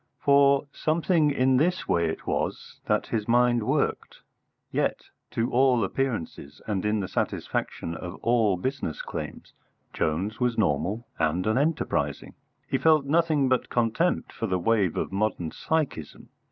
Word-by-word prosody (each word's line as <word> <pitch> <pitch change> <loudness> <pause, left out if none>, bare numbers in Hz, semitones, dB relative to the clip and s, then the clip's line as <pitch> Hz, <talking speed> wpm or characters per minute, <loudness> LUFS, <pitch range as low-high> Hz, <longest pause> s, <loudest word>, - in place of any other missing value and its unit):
For 140 0 +4
something 160 0 +2
in 130 -2 +3
this 175 +6 +1
way 85 -1 +2
it 80 - -6
was - - -3
that - - +1
his 110 -2 -2
mind 120 0 +3
worked. 105 - -1 0.5
Yet, - - -1 0.2
to 115 +2 -1
all 125 -2 +3
appearances, 110 - -3
and 100 -4 -2
in 105 0 +1
the 95 - -3
satisfaction 85 - -3
of 90 +2 -7
all 115 -5 +3
business 130 - -3
claims, - - -7 0.4
Jones 95 +8 -1
was 125 -2 0
normal 105 +4 0
and 85 +4 +1
unenterprising. 140 +9 0 0.3
He - - 0
felt 155 -3 +4
nothing 155 -2 +2
but 130 -1 +1
contempt 120 +9 0
for 115 - -3
the 95 -2 0
wave 100 -1 +1
of - - -2
modern 95 -5 -1
psychism. 150 - -3
115 Hz, 140 wpm, -26 LUFS, 95-140 Hz, 0.5 s, For